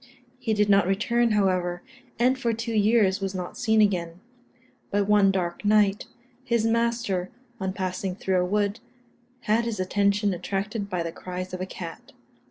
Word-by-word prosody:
He 230 -4 -1
did 210 0 +2
not 200 -3 +4
return, 230 +4 +1
however, 185 -3 +1 0.3
and 250 +3 +3
for 235 -3 -1
two 230 +1 -4
years 210 -2 +3
was 195 0 -3
not 180 -1 -5
seen 220 -2 +2
again; 175 -4 -1 0.7
but 200 0 0
one 205 -2 +5
dark 180 -2 -2
night, 205 -1 +3 0.4
his 235 -3 +1
master, 230 -5 0 0.3
on 190 -2 -2
passing 185 -1 -3
through 190 -1 0
a - - +1
wood, 205 +3 0 0.6
had 225 +1 +1
his 225 -4 -3
attention 200 +2 +1
attracted 200 +3 -3
by 180 -3 -1
the 165 - -4
cries 185 +1 -6
of 185 - -4
a 185 - -3
cat. 170 -3 -9
200 Hz, 165 wpm, -25 LUFS, 185-220 Hz, 0.7 s, one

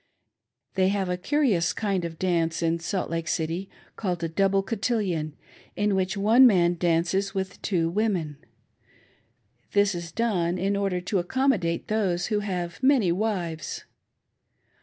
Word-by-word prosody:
They 190 -1 +2
have 195 -1 0
a 180 - 0
curious 205 - +1
kind 195 -5 -1
of 165 -1 -6
dance 170 -2 0
in 165 0 +1
Salt 180 +3 -3
Lake 165 0 -2
City, 170 +4 -2 0.3
called 180 -5 -3
a - - +1
double 195 +3 +1
cotillion, 195 -8 -1 0.4
in 205 0 +1
which 190 +1 0
one 225 +6 +6
man 175 -5 +4
dances 175 +3 0
with 190 -1 -4
two 170 -5 0
women. 175 -6 -1 1.4
This 205 -1 +3
is 170 -1 -6
done 185 -5 0
in 195 +3 0
order 195 -3 -1
to 185 +2 -1
accommodate 180 -4 0
those 190 -5 0
who 210 - +2
have 180 -4 -4
many 260 -9 +4
wives. 175 -6 -2
185 Hz, 140 wpm, -26 LUFS, 170-205 Hz, 1.4 s, one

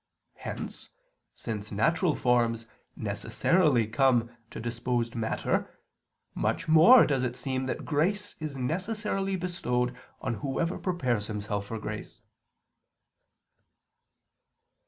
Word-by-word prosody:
Hence, - - -7 0.4
since 105 -2 -6
natural 165 - +2
forms 115 -2 +2 0.3
necessarily 150 -11 +2
come 120 0 +2 0.2
to - - -8
disposed 120 0 -2
matter, 115 -2 -1 0.6
much 165 - -1
more 165 +11 +8
does 135 -3 +1
it 125 -1 -1
seem 130 0 -2
that - - -3
grace 190 +7 0
is 155 -3 -5
necessarily 195 - -1
bestowed 125 -9 -1 0.2
on 130 - -2
whoever 155 +5 -1
prepares 125 - -1
himself 105 -1 -3
for 110 - -4
grace. 105 - -6
130 Hz, 100 wpm, -28 LUFS, 115-170 Hz, 0.6 s, more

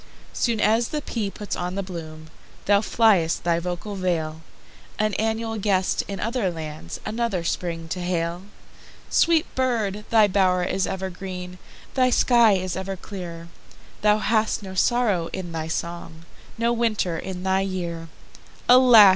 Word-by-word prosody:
Soon 230 -3 0
as 225 +3 +3
the 300 -1 -4
pea 215 -4 -2
puts 205 +1 -5
on 180 +1 -3
the 195 - -2
bloom, 160 -3 -8 0.3
Thou 200 0 +4
fly'st 210 -8 +3
thy 170 -1 +2
vocal 180 +4 -4
vale, 165 -5 -2 0.6
An 215 -1 +1
annual 225 0 -1
guest, 190 -2 +1
in 195 -2 -5
other 230 -2 0
lands, 155 - -7
Another 215 -4 -1
Spring 165 -1 -3
to 180 - -3
hail. 175 -1 -1 0.7
Sweet 330 -2 +4
bird! 220 -6 0
thy 220 -2 +5
bow'r 185 -2 +2
is 190 +2 0
ever 190 0 -3
green, 180 0 -7 0.3
Thy 255 -1 +3
sky 235 -3 +5
is 185 -2 -1
ever 190 +1 -4
clear; 170 -4 -8 0.5
Thou 210 0 +4
hast 215 -1 +1
no 190 -1 -7
sorrow 200 -4 +2
in 180 -2 -5
thy 160 -1 -3
song, 165 0 -5 0.3
No 235 +1 +1
winter 215 -8 0
in 185 -1 -6
thy 190 0 +2
year! 175 -4 -4 0.6
Alas! 245 -5 +9
190 Hz, 150 wpm, -24 LUFS, 175-220 Hz, 0.7 s, Alas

